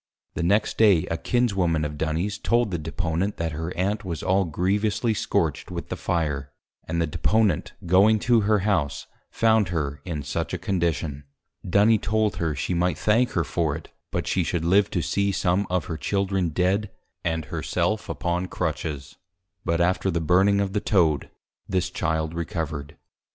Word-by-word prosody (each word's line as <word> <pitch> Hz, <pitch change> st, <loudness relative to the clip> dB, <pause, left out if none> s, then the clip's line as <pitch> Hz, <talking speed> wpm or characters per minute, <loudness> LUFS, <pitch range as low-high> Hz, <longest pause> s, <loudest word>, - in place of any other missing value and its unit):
The -, -, -3 dB
next 100 Hz, +5 st, +1 dB
Day 100 Hz, -7 st, +5 dB
a -, -, +1 dB
Kinswoman 95 Hz, -11 st, +1 dB
of 75 Hz, 0 st, -4 dB
Duny's, 80 Hz, +7 st, -2 dB
told 120 Hz, -3 st, +1 dB
the 85 Hz, -, -2 dB
Deponent, 85 Hz, +4 st, -2 dB
that 85 Hz, -1 st, -2 dB
her 80 Hz, +3 st, -4 dB
Aunt 100 Hz, +4 st, 0 dB
was 85 Hz, -4 st, -4 dB
all 95 Hz, +1 st, +2 dB
grievously 100 Hz, +7 st, 0 dB
scorch'd -, -, -1 dB
with -, -, -6 dB
the -, -, -2 dB
Fire, 75 Hz, -5 st, -2 dB, 0.4 s
and 85 Hz, +1 st, -1 dB
the 85 Hz, -, +2 dB
Deponent 100 Hz, +3 st, +1 dB
going 100 Hz, +5 st, +5 dB
to 120 Hz, -2 st, +4 dB
her 105 Hz, -1 st, +2 dB
House, 80 Hz, -8 st, 0 dB, 0.2 s
found 110 Hz, -3 st, +3 dB
her 75 Hz, -4 st, -2 dB
in 80 Hz, -5 st, -4 dB
such -, -, -3 dB
a -, -, -2 dB
Condition. 80 Hz, -6 st, -2 dB, 0.4 s
Duny 105 Hz, +4 st, +4 dB
told 110 Hz, 0 st, 0 dB
her, 80 Hz, -3 st, -1 dB
she 65 Hz, +7 st, -2 dB
might 90 Hz, +1 st, +1 dB
thank 115 Hz, +4 st, +2 dB
her 85 Hz, -, +1 dB
for 80 Hz, -2 st, -1 dB
it; 80 Hz, -, -9 dB, 0.2 s
but -, -, -2 dB
she -, -, +1 dB
should 85 Hz, -1 st, -2 dB
live 100 Hz, +3 st, +4 dB
to 85 Hz, -, -1 dB
see 100 Hz, 0 st, +1 dB
some 95 Hz, +1 st, +1 dB
of 90 Hz, -2 st, 0 dB
her 80 Hz, -, -4 dB
Children 95 Hz, +1 st, 0 dB
Dead, 95 Hz, +6 st, +1 dB, 0.3 s
and 80 Hz, -1 st, -1 dB
her -, -, -4 dB
self -, -, -1 dB
upon 90 Hz, +1 st, -1 dB
Crutches. 75 Hz, -4 st, -4 dB, 0.5 s
But 85 Hz, 0 st, 0 dB
after 90 Hz, +2 st, +2 dB
the 85 Hz, -2 st, 0 dB
Burning 95 Hz, +5 st, +3 dB
of 100 Hz, -1 st, -1 dB
the 105 Hz, -, 0 dB
Toad, 80 Hz, -8 st, +2 dB, 0.4 s
this 95 Hz, -2 st, 0 dB
Child 80 Hz, 0 st, -1 dB
Recovered. 80 Hz, -3 st, -4 dB
90 Hz, 175 wpm, -25 LUFS, 80-100 Hz, 0.5 s, Day